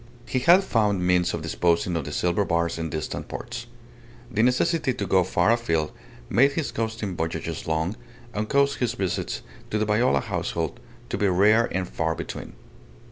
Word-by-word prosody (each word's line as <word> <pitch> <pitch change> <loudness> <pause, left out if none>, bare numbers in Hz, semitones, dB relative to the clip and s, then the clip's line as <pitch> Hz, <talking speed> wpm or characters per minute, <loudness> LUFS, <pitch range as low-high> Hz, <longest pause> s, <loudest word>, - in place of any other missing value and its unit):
He 130 - -1
had 175 +8 +6
found 105 - +1
means 90 -1 +3
of 80 - -4
disposing 85 +2 +1
of 80 -4 -2
the - - -5
silver 90 +3 +1
bars 85 -2 0
in 80 0 -2
distant 80 -1 -4
ports. - - -6 0.6
The 110 - +1
necessity 130 +3 +2
to - - -2
go 95 -1 +4
far 95 - +2
afield 85 -10 +1 0.4
made 140 +4 +4
his 155 -1 -2
coasting 110 -4 -3
voyages 80 -1 -3
long, 80 +5 0 0.4
and 105 0 -2
caused 140 0 +2
his 120 -2 0
visits 95 -7 -2 0.3
to 110 - 0
the 110 - +1
Viola 110 +4 +3
household 85 - -3 0.3
to - - -2
be 105 - +3
rare 105 +5 +4
and 95 -1 -1
far 80 -1 -1
between. - - -7
100 Hz, 175 wpm, -25 LUFS, 85-115 Hz, 0.6 s, had